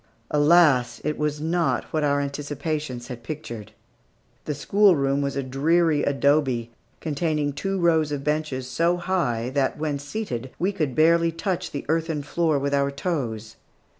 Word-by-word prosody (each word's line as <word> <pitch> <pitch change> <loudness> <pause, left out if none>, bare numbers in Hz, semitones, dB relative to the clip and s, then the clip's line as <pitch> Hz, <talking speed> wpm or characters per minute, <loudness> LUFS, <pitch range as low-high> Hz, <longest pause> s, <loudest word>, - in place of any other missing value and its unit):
Alas! 150 -4 +4
it 150 0 -1
was 150 -1 -1
not 165 +2 0
what 155 -1 +1
our 145 -1 +2
anticipations 145 -2 -4
had 120 -2 -7
pictured. 120 -6 -7 0.7
The 150 - -2
schoolroom 145 -5 +3
was 140 -1 -2
a 140 - -1
dreary 150 +4 +2
adobe, 135 -5 +1 0.3
containing 150 -1 -1
two 195 +7 -2
rows 160 -3 +3
of 140 -2 -3
benches 150 -4 -1
so 170 +7 +1
high 130 -11 -1
that, 135 -1 0
when 150 -2 -2
seated, 145 - -4
we 185 +3 +1
could 155 -10 -2
barely 165 +1 +4
touch 180 +1 -2
the 140 - -6
earthen 160 -1 0
floor 160 +1 +1
with 140 +1 -1
our 140 0 +2
toes. 120 - -4
150 Hz, 150 wpm, -24 LUFS, 140-165 Hz, 0.7 s, Alas